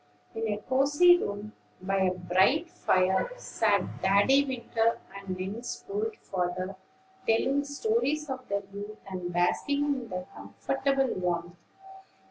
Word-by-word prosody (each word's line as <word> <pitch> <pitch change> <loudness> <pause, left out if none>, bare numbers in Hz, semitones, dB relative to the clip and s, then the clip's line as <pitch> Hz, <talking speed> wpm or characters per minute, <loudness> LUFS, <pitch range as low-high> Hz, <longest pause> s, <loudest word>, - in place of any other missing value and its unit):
In 225 -1 -2
a 205 - -1
cosey 290 +10 +4
room, 205 - -4 0.3
by 195 +1 -1
a 190 -1 +3
bright 190 - +2
fire, 185 - +2
sat - - 0
Daddy 205 +9 +5
Winter 235 -3 0 0.2
and 195 -2 -5
Nell's 210 +6 -5
old 420 +2 -2
father, 185 0 -3 0.5
telling 270 +5 +2
stories 305 0 0
of 260 -2 -5
their 200 0 -1
youth, 205 +1 -7
and 180 -2 -4
basking 280 - +1
in 265 -5 -2
the 180 -1 -4
comfortable 135 - -1
warmth. 175 -1 -2
210 Hz, 125 wpm, -29 LUFS, 185-275 Hz, 0.5 s, Daddy